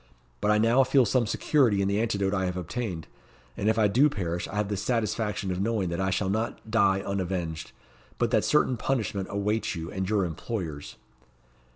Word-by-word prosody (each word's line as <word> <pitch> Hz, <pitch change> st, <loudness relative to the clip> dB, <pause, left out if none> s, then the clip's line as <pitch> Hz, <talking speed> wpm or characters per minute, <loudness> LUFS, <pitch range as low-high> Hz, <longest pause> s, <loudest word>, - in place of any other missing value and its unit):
But 105 Hz, -, +1 dB
I 105 Hz, -, +4 dB
now 115 Hz, +5 st, +4 dB
feel 130 Hz, 0 st, +4 dB
some 120 Hz, +1 st, +1 dB
security 120 Hz, -5 st, +2 dB
in 100 Hz, -, +1 dB
the 100 Hz, +2 st, +1 dB
antidote 100 Hz, -4 st, 0 dB
I 95 Hz, -2 st, 0 dB
have 90 Hz, 0 st, -2 dB
obtained; 90 Hz, -2 st, -4 dB, 0.5 s
and 105 Hz, -, 0 dB
if 110 Hz, -, +1 dB
I 110 Hz, -2 st, +4 dB
do 130 Hz, +9 st, +4 dB
perish 90 Hz, -, -3 dB
I -, -, -8 dB
have 105 Hz, -1 st, 0 dB
the 100 Hz, -, -2 dB
satisfaction 105 Hz, -2 st, -1 dB
of 90 Hz, +1 st, -2 dB
knowing 105 Hz, -4 st, 0 dB
that 85 Hz, +2 st, -2 dB
I 95 Hz, -, +1 dB
shall 95 Hz, 0 st, 0 dB
not 110 Hz, +1 st, -3 dB
die 100 Hz, -4 st, +3 dB
unavenged, 90 Hz, -5 st, -3 dB, 0.5 s
but -, -, 0 dB
that -, -, +3 dB
certain 125 Hz, -, +2 dB
punishment 105 Hz, -6 st, -1 dB
awaits 105 Hz, +1 st, -1 dB
you 80 Hz, +1 st, -6 dB
and 95 Hz, -1 st, -3 dB
your 105 Hz, -3 st, +2 dB
employers." 80 Hz, -3 st, -5 dB
100 Hz, 195 wpm, -27 LUFS, 95-115 Hz, 0.5 s, I